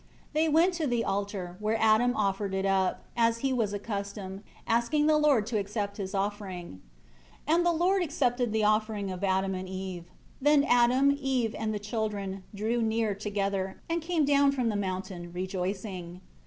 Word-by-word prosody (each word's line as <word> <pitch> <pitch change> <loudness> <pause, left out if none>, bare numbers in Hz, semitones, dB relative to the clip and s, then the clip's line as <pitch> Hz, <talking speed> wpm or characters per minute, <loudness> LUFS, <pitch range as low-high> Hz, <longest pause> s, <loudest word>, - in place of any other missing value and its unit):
They 315 +1 +2
went 335 +5 +4
to 330 -4 -1
the 240 -2 0
altar, 195 -3 -3
where 215 +1 0
Adam 225 +3 +4
offered 195 -1 0
it 190 0 -1
up, 190 -1 +1
as 230 -1 +2
he 265 - +2
was 225 -5 0
accustomed, 200 -1 -5 0.2
asking 235 +6 +2
the 310 0 +4
Lord 285 -8 +4
to 220 -1 -1
accept 200 0 -3
his 195 -1 -4
offering. 195 - -4 0.6
5 310 - +3
And 350 - +3
the - - +5
Lord 360 +4 +2
accepted 255 -7 0
the 220 0 +1
offering 215 -2 +1
of 185 +1 -6
Adam 190 0 +1
and 185 0 -5
Eve. 185 -2 -5 0.4
Then 290 0 +5
Adam, 255 +2 +4
Eve, 255 -5 0
and 220 -1 -2
the 215 - -2
children, 205 -2 -3
drew 225 +4 0
near 220 -1 +1
together, 200 -1 -2
and 335 0 -1
came 325 -2 +1
down 280 0 +4
from 250 -4 0
the 215 - -1
mountain, 185 -3 -4
rejoicing. 185 -1 -4
210 Hz, 175 wpm, -29 LUFS, 195-245 Hz, 0.6 s, the